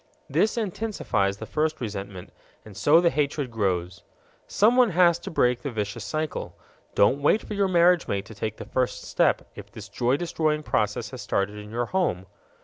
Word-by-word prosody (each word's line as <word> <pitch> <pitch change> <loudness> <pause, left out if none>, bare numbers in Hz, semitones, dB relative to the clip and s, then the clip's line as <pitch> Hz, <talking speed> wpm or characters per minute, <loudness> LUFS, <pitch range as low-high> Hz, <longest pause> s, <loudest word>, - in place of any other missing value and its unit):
This 220 +2 +1
intensifies 205 - -1
the 110 - -7
first 155 +5 -1
resentment, 100 -5 -6 0.3
and 105 -3 -12
so 150 - +5
the 170 -1 +3
hatred 145 -3 -1
grows. 90 -5 -2 0.5
Someone 240 +3 +4
has 175 -2 +4
to 170 - -7
break 125 -6 +1
the 140 - -3
vicious 105 -1 -4
cycle. 155 +9 -4 0.4
Don't 130 +8 +3
wait 175 +9 +3
for - - -6
your 200 -1 +1
marriage 175 -1 +4
mate 100 0 -2
to 110 - -11
take 110 +1 -4
the - - -8
first 130 -1 -2
step - - +1
if - - -11
this 100 -2 -10
joy 125 +5 +1
destroying 155 -2 -1
process 105 -3 -1
has 130 -2 -7
started 105 +2 -1
in 105 0 -9
your 120 +2 -2
home. 145 - -1
130 Hz, 180 wpm, -25 LUFS, 105-170 Hz, 0.5 s, so